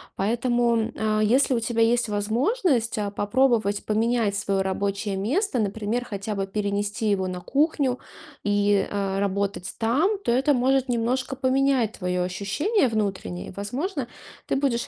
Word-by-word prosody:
Поэтому, 240 +3 +1
м, 225 +1 -1
а, 215 0 +1
если 255 +6 +3
у 240 - +2
тебя 230 0 +1
есть 235 0 +2
возможность, 235 - +1
а, 205 -1 -2
попробовать 215 -1 +1
поменять 220 -1 +1
своё 200 -1 0
рабочее 200 +1 -2
место, 265 - 0
например, 215 +3 -1
хотя 205 -1 -4
бы 195 -1 -2
перенести 205 +2 -1
его 190 -2 0
на 180 -1 -4
кухню 275 - +1 0.4
и, 205 -1 +2
а, 195 -1 -1
работать 200 -1 -3
там, 290 - +2
то - - +1
это 270 +4 +3
может 265 +1 +2
немножко 250 +2 -1
поменять 260 -3 +2
твоё 180 -1 -1
ощущение 205 - 0
внутреннее. 200 -5 -2
И, - - -8
возможно, 255 - -3 0.4
ты - - -1
будешь 270 -4 0
225 Hz, 150 wpm, -25 LUFS, 200-255 Hz, 0.4 s, если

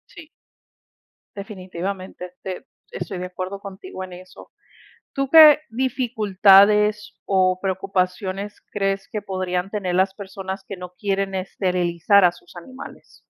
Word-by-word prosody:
Sí. 325 -3 -12 1.1
Definitivamente, 185 -2 -6
te 185 -1 -6 0.3
estoy 185 -3 -5
de 180 - -4
acuerdo 185 +2 -6
contigo 195 - -9
en 185 -1 -9
eso, 185 +1 -13 0.6
¿tú 275 -1 -2
qué 305 -1 +9
dificultades 210 -4 +3
o 185 -1 +2
preocupaciones 190 +1 -2
crees 195 -1 -1
que 215 -3 -3
podrían 185 -1 -3
tener 190 -4 -2
las 190 +1 +2
personas 190 -1 -7
que 195 - -7
no 180 0 -9
quieren 195 -1 -1
esterilizar 185 0 +1
a 175 - +5
sus 175 0 -18
animales? 260 +10 -12
195 Hz, 120 wpm, -22 LUFS, 185-205 Hz, 1.1 s, qué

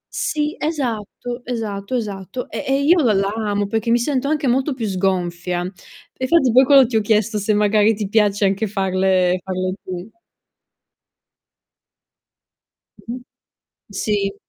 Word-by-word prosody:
Sì, 300 0 -1
esatto, 245 -5 -3
esatto, 220 -2 -4
esatto, 210 +1 -4
e - - -4
e 270 +1 +2
io 335 +4 +5
la 235 -6 +3
l'amo 205 +1 0
perché 220 +3 -2
mi 235 - +4
sento 260 +2 -1
anche 300 0 0
molto 265 +3 +1
più 235 -3 -3
sgonfia. 180 -2 -1
Infatti 260 - -1
poi 255 +3 +6
quando 275 -1 +7
ti 230 -1 0
ho - - +2
chiesto 215 0 +1
se 205 +1 +1
magari 210 +1 +3
ti 205 -1 -3
piace 205 -1 +2
anche 195 +3 0
farle 185 -2 +1
farle 185 -1 -2
tu. 180 0 -6 2.9
Mh-mh, 245 +2 -7 0.7
sì. 200 0 -1
215 Hz, 135 wpm, -20 LUFS, 195-250 Hz, 2.9 s, quando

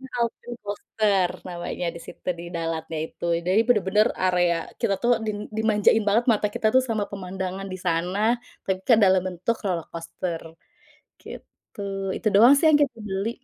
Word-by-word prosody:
New 265 -1 -12
Alpen 235 +1 -3
Coaster 205 -2 0 0.2
namanya 175 0 -4
di 170 - -9
situ, - - -10
di 170 - -8
Dalatnya 165 -1 -3
itu. - - -11 0.2
Jadi 190 +4 +4
bener-bener 210 -1 +3 0.2
area, 175 -2 +3 0.3
kita 200 - +1
tuh 240 - +2 0.2
dim 215 -1 -2 0.2
dimanjain 220 0 +3
banget 230 +4 +3
mata 210 -1 +1
kita - - 0
tuh 260 - +6
sama 220 -3 0
pemandangan 190 0 -5
di - - -4
sana, 175 +3 0 0.5
tapi 190 -1 0
kan 235 -3 +6
dalam 190 -1 +4
bentuk 185 +6 -2
roller 175 -5 -1
coaster, 170 0 -5 0.8
gitu. - - -12 0.4
Itu - - -9
doang 235 +6 +8
sih 320 - +2
yang 300 - +6
kita 250 -5 0
beli. 195 +3 -2
195 Hz, 165 wpm, -24 LUFS, 180-220 Hz, 0.8 s, doang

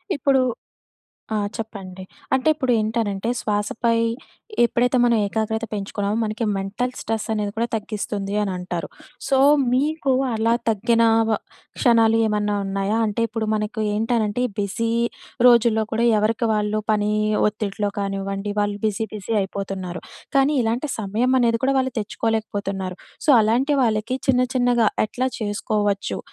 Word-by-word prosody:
ఇప్పుడు 275 -2 +2 0.9
ఆ! - - +1 0.2
చెప్పండి. 195 -4 -7 0.3
అంటే 265 +3 +1
ఇప్పుడు 260 -4 -1
ఏంటనంటే 215 -1 -1
శ్వాసపై 215 +3 0 0.7
ఎప్పుడైతే 245 +2 +2
మనం 235 -1 +4
ఏకాగ్రత 220 +1 -2
పెంచుకున్నామో 205 +1 -2
మనకి 220 +2 -2
మెంటల్ 200 +6 -2
స్ట్రెస్ 220 0 -3
అనేది 205 -1 -2
కూడా 235 +1 +1
తగ్గిస్తుంది 205 -2 -4
అని 200 -2 -1
అంటారు. 180 -1 -4 0.4
సో, 270 -1 +3 0.4
మీకు 285 +1 +1 0.2
అలా 225 +1 +1 0.2
తగ్గిన 230 +2 +2 0.3
వ 215 - +2 0.4
క్షణాలు 225 -3 +4
ఏమన్నా 210 -1 0
ఉన్నాయా? 195 +2 -1
అంటే 210 +2 -1
ఇప్పుడు 220 0 -3
మనకు 210 +1 -3
ఏంటనంటే 225 +1 0 0.2
బిజీ 225 +3 -1 0.6
రోజుల్లో 230 -2 +4
కూడా 235 +2 +2
ఎవరికి 225 +2 +1
వాళ్ళు 210 0 0
పని 210 0 +1 0.4
ఒత్తిడిలో 210 -1 -2
కానివ్వండి. 195 +1 -3
వాళ్ళు 205 0 0
బిజీ 215 +1 0
బిజీ 210 +1 -6
అయిపోతున్నారు. 190 -2 -5 0.4
కానీ 275 +2 +4
ఇలాంటి 240 +6 -1
సమయం 220 +5 0
అనేది 230 -1 +2
కూడా 275 0 +2
వాళ్ళు 260 -1 -1
తెచ్చుకోలేకపోతున్నారు. 205 -4 -3 0.3
సో, - - +1
అలాంటి 255 +7 +2
వాళ్ళకి 225 +3 0
చిన్న 250 -1 +4
చిన్నగా 245 -3 +3 0.2
ఎట్లా 255 +3 -1
చేసుకోవచ్చు? 205 -1 -1
220 Hz, 130 wpm, -22 LUFS, 205-235 Hz, 0.9 s, మనం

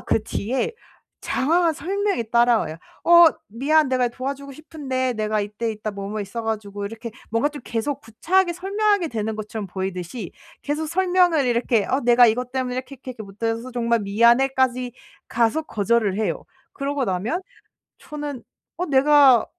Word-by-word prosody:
그 220 - 0
뒤에 245 - -2 0.5
장황한 330 +5 +2
설명이 385 - -2
따라와요. 235 -8 +3 0.3
"어 345 0 +8 0.2
미안. 285 +7 +2
내가 255 -1 +1
도와주고 275 +3 -6
싶은데 265 -4 -3
내가 215 -1 -1
이때 210 +3 -3
이따 215 0 -4
뭐, 200 -1 -6
뭐 215 +1 -4
있어 205 +4 -5
가지고..." 205 -2 -4
이렇게 225 +2 -7 0.2
뭔가 230 +6 +2
좀 295 -1 -9
계속 255 +5 -2
구차하게 345 - +1
설명하게 395 0 0
되는 220 -3 -3
것처럼 215 -1 -5
보이듯이 190 +1 -5 0.3
계속 300 +2 -2
설명을 355 -3 +2
이렇게 235 -3 +1
"어 265 - 0
내가 240 0 +6
이것 245 +2 0
때문에 255 -1 -2
이렇게, 260 +2 -5
이렇게, 260 0 -9
이렇게 235 -3 -8
못 200 +3 -16
해서 230 +2 -2
정말 235 -1 +1
미안해." 235 +6 +4
까지 255 -1 +1 0.4
가서 235 +7 +1
거절을 215 -5 0
해요. 185 -7 -2 0.3
그러고 280 -1 -2
나면 215 - -2 0.6
저는 295 -4 -6 0.4
'어 360 - -1
내가 275 -4 +5
245 Hz, 350 characters per minute, -23 LUFS, 220-290 Hz, 0.6 s, 어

